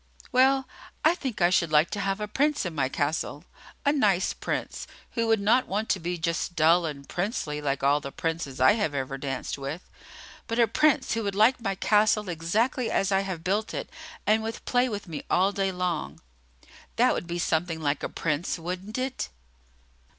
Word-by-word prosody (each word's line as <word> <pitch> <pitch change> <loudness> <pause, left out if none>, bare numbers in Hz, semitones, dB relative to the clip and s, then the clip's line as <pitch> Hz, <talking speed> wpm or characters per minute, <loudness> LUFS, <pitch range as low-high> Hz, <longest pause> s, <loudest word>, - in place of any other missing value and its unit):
"Well, 265 +1 +4 0.4
I 320 - +6
think 265 - -5
I 175 - +5
should 170 -3 +2
like 155 +3 +4
to 205 - -3
have 195 0 -1
a 210 - -3
Prince 290 +4 +1
in 175 - -3
my 135 -4 0
castle, 145 +3 -2 0.4
a 285 - +4
nice 205 -10 +2
Prince, - - -4 0.2
who 230 -2 -1
would 225 -1 +3
not 230 +6 +3
want 210 +3 -2
to 190 - +2
be 175 +1 -3
just 170 +1 -2
dull 165 +2 +4
and 140 -2 -7
princely 175 - -2
like 140 -2 -1
all 140 +1 +4
the 140 - -6
princes 160 -5 -3
I 130 +1 +7
have 205 -10 0
ever 135 0 -3
danced 135 0 -4
with, 140 +6 -6 0.6
but 230 - -2
a 235 - +6
Prince 295 +5 +2
who 225 - -1
would 200 -2 -2
like 230 +5 +4
my 195 -3 -1
castle 210 0 +2
exactly 220 - 0
as 195 0 +1
I 195 - +4
have 190 -4 -4
built 205 +4 -1
it - - -5 0.3
and 215 +1 +3
would 225 +1 -5
play 250 0 +2
with 205 -3 -5
me 160 -3 -5
all 190 +3 +3
day 195 -1 0
long. 175 - -3 0.8
That - - +4
would - - -4
be 175 0 -3
something 165 -1 0
like 145 -2 -1
a - - -3
Prince, 165 +3 -2
wouldn't 185 +6 -5
it?" 260 0 -3
185 Hz, 195 wpm, -27 LUFS, 160-220 Hz, 0.8 s, I